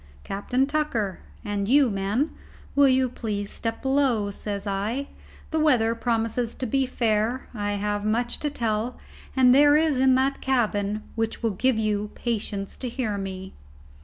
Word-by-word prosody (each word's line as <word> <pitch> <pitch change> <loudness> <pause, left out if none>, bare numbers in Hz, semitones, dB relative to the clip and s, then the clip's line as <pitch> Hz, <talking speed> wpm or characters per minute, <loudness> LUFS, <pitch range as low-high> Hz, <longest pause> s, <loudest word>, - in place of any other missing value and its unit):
"Captain 250 +7 0
Tucker, 275 - -1 0.3
and 205 0 -2
you, 270 -2 +5
men, 200 +9 0 0.4
will 285 0 +6
you 260 0 +3
please 210 -4 -4
step 225 -1 -4
below," 265 -7 +2
says 200 0 -5
I. 210 +8 -2 0.4
"The 320 - +1
weather 245 -7 +3
promises 230 0 -1
fair; 245 -2 0
I 205 -2 -2
have 205 0 -1
much 235 +3 0
to 295 - -1
tell, 230 -2 -2 0.4
and 255 -2 +6
there 290 +2 +6
is 310 -4 +2
that - - +3
in 260 -1 +6
the 265 +1 +2
cabin 215 -5 0
which 225 +1 -2
will 225 - +2
give 245 +5 +1
you 210 -1 0
patience 205 -4 -3
to 255 - -4
hear 230 -4 -2
me." 190 -1 -6
230 Hz, 155 wpm, -25 LUFS, 205-260 Hz, 0.4 s, will